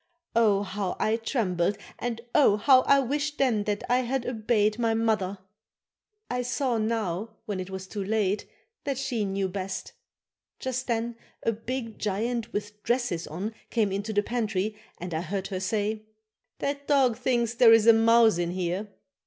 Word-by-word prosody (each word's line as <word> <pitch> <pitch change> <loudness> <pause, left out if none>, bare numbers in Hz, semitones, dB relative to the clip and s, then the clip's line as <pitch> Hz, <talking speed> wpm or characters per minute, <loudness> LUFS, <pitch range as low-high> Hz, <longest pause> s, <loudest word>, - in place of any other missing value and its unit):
Oh! 210 -3 +4
how 195 -1 -3
I 220 - +2
trembled 205 -6 0 0.2
and 235 -1 -3
oh! 260 -9 +5
how 255 +4 +6
I 280 - +6
wished 290 +3 -2
then 230 -6 +2
that 210 -1 -1
I 250 +1 +3
had 255 0 -1
obeyed 215 -2 +1
my 225 -1 +2
mother. 215 -4 0 0.9
I 250 0 -1
saw 250 -1 0
now, 215 -1 -2
when 205 -4 -3
it 185 0 -5
was 190 0 -6
too 200 +1 -5
late, 205 0 0 0.4
that 275 -3 -2
she 240 -5 -1
knew 195 0 -1
best. 190 0 -5 0.6
Just 260 0 -3
then 235 0 -1 0.3
a 230 - +2
big 230 +1 -5
giant 225 +3 -1
with 210 0 -5
dresses 235 -9 -1
on 190 +8 -4 0.2
came 215 -4 +1
into 200 +3 -2
the 205 -1 +2
pantry 215 -3 -1 0.2
and 180 0 -6
I 160 - -1
heard 190 +2 -3
her 190 -2 -3
say: 215 +2 -2 0.5
"That 280 0 -3
dog 265 -5 +4
thinks 235 -1 0
there 235 -1 +7
is 225 -1 +6
a 230 - +9
mouse 225 -3 +5
in 170 -1 0
here." 180 +3 -2
220 Hz, 170 wpm, -27 LUFS, 200-240 Hz, 0.9 s, a